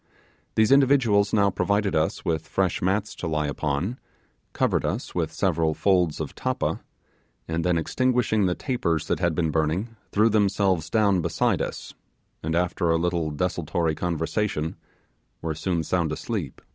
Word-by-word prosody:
These 110 +1 +3
individuals 130 -7 +4
now 100 -2 +3
provided 100 0 0
us 80 +1 0
with 80 -2 -1
fresh 95 -3 0
mats 100 +3 0
to 90 - -4
lie 75 -1 0
upon, 75 - -2 0.5
covered - - +1
us - - -3
with - - -1
several 80 -4 +1
folds 90 -5 +2
of - - -4
tappa, - - -2 0.7
and 80 0 -1
then 90 -1 +2
extinguishing 115 +2 +1
the 90 - 0
tapers 85 - -1
that - - -1
had 85 -3 +1
been 80 -2 0
burning, 80 +9 -1 0.2
threw 110 +2 +4
themselves 100 -5 +1
down 100 -5 +3
beside 85 -1 +1
us, - - -5 0.5
and 80 +1 -2
after 90 0 0
a 80 - +3
little 85 -1 0
desultory 80 0 -1
conversation 80 0 -2 0.6
were 80 -1 -3
soon 85 +1 -1
sound 85 -1 0
asleep. 85 - -4
90 Hz, 150 wpm, -25 LUFS, 80-100 Hz, 0.7 s, individuals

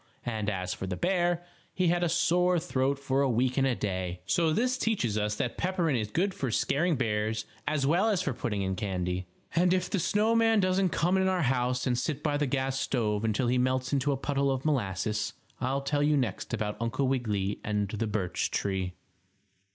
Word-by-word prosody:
And 110 -3 -1
as 90 -2 -2
for 95 - -5
the 90 - -2
bear, 175 - +1 0.3
he 185 -2 +2
had 175 +1 +2
a 175 - +2
sore 175 +1 +3
throat 140 -5 0
for 135 0 0
a 140 - +2
week 125 +2 +1
and 135 0 +3
a 125 - +1
day. 90 -4 -3
So 165 -2 +2
this 250 +9 +1
teaches 155 - 0
us 105 0 0
that 120 - -3
peppermint 175 -8 +1
is 105 -1 -3
good 185 - 0
for 135 - -2
scaring 155 +8 +1
bears, 110 -2 -1 0.2
as 150 -2 +1
well 175 +10 +3
as 190 -4 +1
for 140 - -1
putting 105 -3 -2
in 95 0 -1
candy. 90 -2 -2 0.3
And 180 +2 +4
if 180 0 -2
the 195 - +1
snow 210 +6 +2
man 225 -1 +4
doesn't 185 0 +2
come 175 +3 +1
in 190 0 +2
our 185 -3 +1
house 125 -1 +1
and 125 -2 +1
sit 145 +3 -3
by 145 -2 +1
the 145 -1 0
gas 135 0 -1
stove 110 -6 0
until 110 +3 +1
he 125 +1 +2
melts 130 +1 0
into 140 +1 +2
a 135 - 0
puddle 140 0 0
of 135 +1 -1
molasses, 105 -6 -1 0.3
I'll 135 +2 0
tell 145 +1 0
you 150 0 +3
next 120 -8 -2
about 105 -1 -2
Uncle 115 +4 0
Wiggily 105 -7 -1
and 105 -1 0
the 110 +2 -2
birch 95 -5 -1
tree. 95 -2 -2
130 Hz, 210 wpm, -29 LUFS, 105-170 Hz, 0.3 s, And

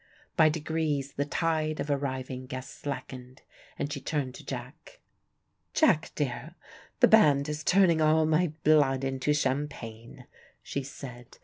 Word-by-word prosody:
By 155 - +6
degrees 150 -3 -2
the 140 - -1
tide 155 0 -1
of 145 - -2
arriving 130 -2 -3
guests 130 0 -7
slackened, 130 -2 -7 0.3
and 145 - -3
she 140 - -5
turned 135 -3 -2
to - - -11
Jack. - - -8 0.8
"Jack - - +3
dear, - - -3 0.5
the - - +8
band 140 -1 +5
is 150 0 -4
turning 180 -3 +4
all 155 +1 +4
my 160 +1 +2
blood 140 -4 +4
into 135 +2 0
champagne," 130 -5 -3 0.4
she 140 - -3
said. 130 -2 -10
145 Hz, 135 wpm, -28 LUFS, 130-155 Hz, 0.8 s, the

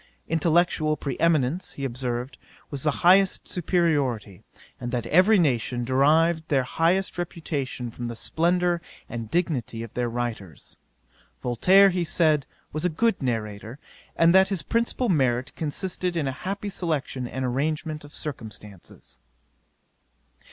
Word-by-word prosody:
Intellectual 160 -1 +2
pre 140 -3 -4
eminence, 165 0 +1
he 140 - -5
observed, 125 -1 -4 0.3
was 140 -2 -2
the 150 - +2 0.2
highest 190 +2 +5
superiority; 145 - 0 0.4
and 120 0 -5
that 120 -2 -2
every 185 - +5
nation 125 -6 +1
derived 160 +5 +3
their 135 -3 +2
highest 175 +7 0
reputation 140 -8 -4
from 120 +1 -6
the 120 - -5
splendour 175 +5 +1 0.3
and 115 -2 -6
dignity 130 -9 -1
of 115 - -10
their 120 -1 -1
writers. 115 - -5 0.7
Voltaire, 190 - +5
he 180 -1 0
said, 155 -3 +2 0.3
was 155 +2 -3
a 180 - +2
good 205 +5 +1
narrator, 110 -1 -3 0.4
and 165 +1 +5
that 190 0 +6
his 190 -6 -2
principal 235 - 0
merit 130 - +1
consisted 175 +3 -2
in 150 -4 0
a - - 0
happy 200 +8 -5
selection 150 -9 -2
and 130 +1 -4
arrangement 150 +4 -2
of 145 - -13
circumstances. 105 - -8
150 Hz, 135 wpm, -25 LUFS, 120-175 Hz, 0.7 s, that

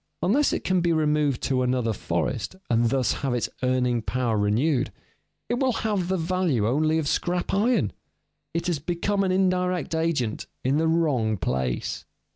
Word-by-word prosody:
Unless 265 +11 +3
it - - -2
can 185 -1 +2
be 170 0 +2
removed 150 -4 +1
to 130 -1 +1
another 125 -3 +1
forest 100 - -2 0.2
and 115 0 +3
thus 130 -3 +1
have 135 -3 0
its 120 - -1
earning 125 -2 +1
power 120 0 -1
renewed, 115 +7 +1 0.6
it 240 +2 -1
will 265 -1 +2
have 210 -5 -1
the 190 +1 0
value 165 - 0
only 155 +6 +2
of 155 -3 -1
scrap 175 +4 -1
iron; 230 +5 +2 0.6
it 170 0 -2
has 175 -5 0
become 180 +6 -1
an 190 - +1
indirect 180 -3 +1
agent 160 -9 -1 0.2
in 135 +3 +2
the 160 +1 +2
wrong 140 -10 +1
place. 65 -7 -2
155 Hz, 165 wpm, -25 LUFS, 125-180 Hz, 0.6 s, Unless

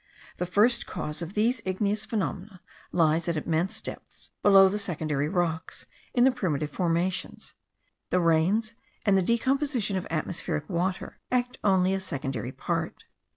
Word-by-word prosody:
The 180 - -2
first 225 +6 +3
cause 150 +3 -5
of 170 +3 -6
these 230 +3 +2
igneous 205 +3 -1
phenomena 200 -3 -3 0.3
lies 160 -1 +2
at 170 -2 0
immense 165 +4 -1
depths - - -9
below 195 -1 +7
the 205 +2 -1
secondary 155 -6 -1
rocks, 165 -3 -2 0.3
in 245 - +5
the 265 - +6
primitive 155 - -2
formations: 180 +2 -1 0.6
the 180 - +2
rains 180 +7 +2 0.3
and 200 -2 +4
the 190 - +4
decomposition 240 0 +1
of 185 - -4
atmospheric 155 -1 -2
water 180 +1 -2
act 250 0 0
only 190 -2 +3
a 195 - 0
secondary 135 - -4
part. - - -3
185 Hz, 145 wpm, -27 LUFS, 165-210 Hz, 0.6 s, below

